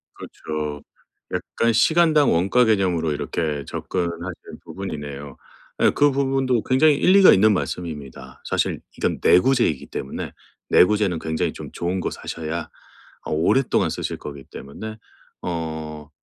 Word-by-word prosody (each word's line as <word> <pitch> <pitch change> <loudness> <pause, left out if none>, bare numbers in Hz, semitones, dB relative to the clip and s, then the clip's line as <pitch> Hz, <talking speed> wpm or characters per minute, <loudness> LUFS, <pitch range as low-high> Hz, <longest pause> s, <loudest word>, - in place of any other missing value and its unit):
그렇죠. 75 -2 -6 0.5
약간 115 0 0
시간당 155 +3 +4
원가 95 +9 +3
개념으로 90 -7 +1
이렇게 75 0 -2
접근하시는 85 0 -5
부분이네요. 75 -7 -6 0.5
예 - - +5
그 145 0 +4
부분도 135 -3 +1
굉장히 145 +4 +4
일리가 185 +6 +6
있는 110 +3 +5
말씀입니다. 70 -9 -5
사실 - - -1 0.2
이건 - - -1
내구재이기 115 - +3
때문에 65 - -5 0.4
내구재는 100 -2 +4
굉장히 80 0 -2
좀 - - -9
좋은 90 +2 -2
거 - - -2
사셔야 80 0 -5 0.5
어 - - -6
오랫동안 85 - +2
쓰실 - - -4
거기 70 -2 -9
때문에 110 +11 -9 0.5
어 80 -3 -5
90 Hz, 310 characters per minute, -22 LUFS, 75-115 Hz, 0.5 s, 일리가